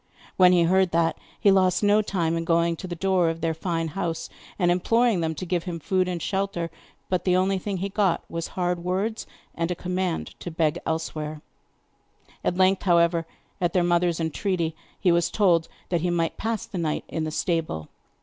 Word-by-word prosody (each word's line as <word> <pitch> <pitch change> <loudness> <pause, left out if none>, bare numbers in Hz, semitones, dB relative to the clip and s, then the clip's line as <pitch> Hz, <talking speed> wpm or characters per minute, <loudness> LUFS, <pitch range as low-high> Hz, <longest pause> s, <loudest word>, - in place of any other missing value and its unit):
When 180 -1 +6
he 175 -2 +5
heard 185 +2 +3
that, 165 0 +2 0.2
he 200 - +5
lost 185 0 +3
no 205 +1 +5
time 170 -5 -1
in 165 - -1
going 170 0 +2
to 185 - -7
the 175 - -4
door 185 -1 +2
of 165 0 -4
their 165 0 +1
fine 165 0 -2
house 170 -1 -3 0.3
and 175 -3 +3
imploring 225 +3 +2
them 160 -1 -1
to 185 - -5
give 175 -1 -1
him 170 -2 -4
food 185 +3 +1
and 180 -1 -2
shelter; 190 -3 -2 0.4
but 185 -2 0
the 180 -1 +3
only 190 +1 +2
thing 195 +1 -3
he 195 +2 -2
got 195 -4 +1
was 165 0 -4
hard 175 -1 0
words, 195 +5 -2 0.3
and 165 0 -2
a 180 - -1
command 180 -1 -2
to - - -6
beg 160 -2 0
elsewhere. 155 -1 -3 1.0
At 180 - 0
length, 190 0 +4
however, 170 -2 +3 0.3
at 175 -1 +1
their 180 - +3
mother's 175 -1 +2
entreaty, 165 0 -1 0.2
he 180 - +3
was 170 0 +2
told 175 -6 +3 0.2
that 175 -3 +1
he 180 - 0
might 170 -1 0
pass 225 0 -2
the 185 - -5
night 155 -2 -1
in 160 - -3
the 155 - -2
stable. 160 - -2
175 Hz, 200 wpm, -25 LUFS, 165-185 Hz, 1.0 s, When